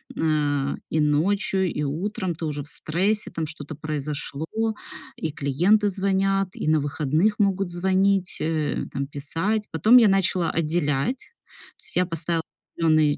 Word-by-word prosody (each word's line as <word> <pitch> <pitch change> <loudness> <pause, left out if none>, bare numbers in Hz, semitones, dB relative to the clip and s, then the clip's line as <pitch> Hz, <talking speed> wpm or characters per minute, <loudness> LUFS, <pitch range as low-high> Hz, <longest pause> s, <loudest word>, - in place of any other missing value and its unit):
эм, 145 -3 0
и 155 - 0
ночью, 185 +5 +1
и 150 - -2
утром 185 +5 -2
ты 165 - -5
уже 145 -2 -3
в - - -11
стрессе, 190 +8 -1
там 160 -2 -3
что-то 150 -1 -8
произошло, 150 0 -4 0.7
и 160 - -3
клиенты 175 +10 +2
звонят, 195 0 +1
и - - -4
на 155 -1 +4
выходных 155 +8 0
могут 195 -2 +1
звонить, 190 +1 +1
э, 155 -2 -1
там 140 0 -3
писать. 165 +10 -2
Потом 220 +10 +6
я 225 -3 +7
начала 190 -3 +2
отделять. 155 - -1 0.5
То - - -29
есть - - -10
я 180 0 +3
поставила 165 -1 -1 0.3
определённые 155 -3 +3
165 Hz, 145 wpm, -24 LUFS, 150-195 Hz, 0.7 s, я